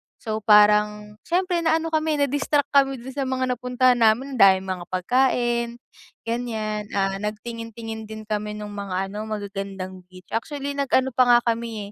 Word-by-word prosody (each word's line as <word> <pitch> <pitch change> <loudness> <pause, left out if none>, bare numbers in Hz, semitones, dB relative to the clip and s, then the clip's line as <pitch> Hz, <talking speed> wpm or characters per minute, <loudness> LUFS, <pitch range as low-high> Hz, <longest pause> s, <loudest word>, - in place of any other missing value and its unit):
So 220 -1 -4
parang, 210 0 +4
siyempre 360 0 +1
na-ano 325 0 +1
kami, 310 -1 +1
na-distract 285 +1 0
kami 270 -1 +4
doon 255 +3 -9
sa 275 -2 -2
mga 260 0 0
napuntahan 250 0 +2
namin 240 +3 +2
dahil 190 -1 +6
mga 185 -2 -5
pagkain, 240 +3 +1 0.5
gan'yan, 220 -3 -3
ah, 195 0 0
nagtingin-tingin 225 0 -6
din 220 0 -7
kami 210 0 -3
nung 210 -1 -7
mga 195 -2 -3
ano, 215 +1 -5
magagandang 195 -3 -6
beach, 185 0 -15
actually, 285 +4 -3
nag-ano 265 -2 +1
pa 255 0 +3
nga 240 0 +7
kami, 225 -3 -3
225 Hz, 150 wpm, -23 LUFS, 210-260 Hz, 0.5 s, nga